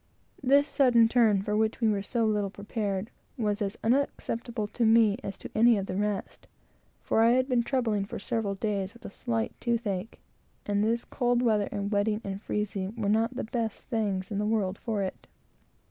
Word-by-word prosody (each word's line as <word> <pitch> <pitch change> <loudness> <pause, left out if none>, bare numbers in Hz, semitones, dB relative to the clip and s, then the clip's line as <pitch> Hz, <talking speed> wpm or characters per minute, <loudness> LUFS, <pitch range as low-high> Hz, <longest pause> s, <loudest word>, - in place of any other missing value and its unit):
This 280 +2 +4
sudden 245 -6 +4
turn, 220 -5 +3
for 210 0 -1
which 220 +1 +1
we 230 - +2
were 205 -2 +1
so 230 +3 0
little 210 -2 +1
prepared, 205 0 -3 0.3
was 210 -2 -1
as 200 0 -2
unacceptable 235 -2 -1
to 235 +3 -2
me 225 -1 +5
as 195 - -5
to - - -9
any 230 0 +5
of 195 - -2
the 185 - -4
rest; 205 0 -3 0.5
for 225 - +1
I 230 +1 +5
had 255 +1 +2
been 250 -3 +2
troubled 225 -6 0
for - - -5
several 205 -1 -2
days 200 0 -2
with 235 - -16
a - - -7
slight 115 - -2
tooth 235 -1 0
ache, 195 +2 -3 0.5
and 205 0 +1
this 230 +2 0
cold 245 -1 +1
weather, 215 -4 +2
and 200 0 -3
wetting 210 +1 +1
and 195 0 -5
freezing, 205 -1 -3
were 210 -3 -1
not 225 +3 +2
the - - -3
best 225 -1 -4
things 205 -3 -1
in 200 - -1
the 210 - 0
world 200 -3 0
for 215 -4 -2
it. 190 - -6
215 Hz, 195 wpm, -28 LUFS, 200-235 Hz, 0.5 s, me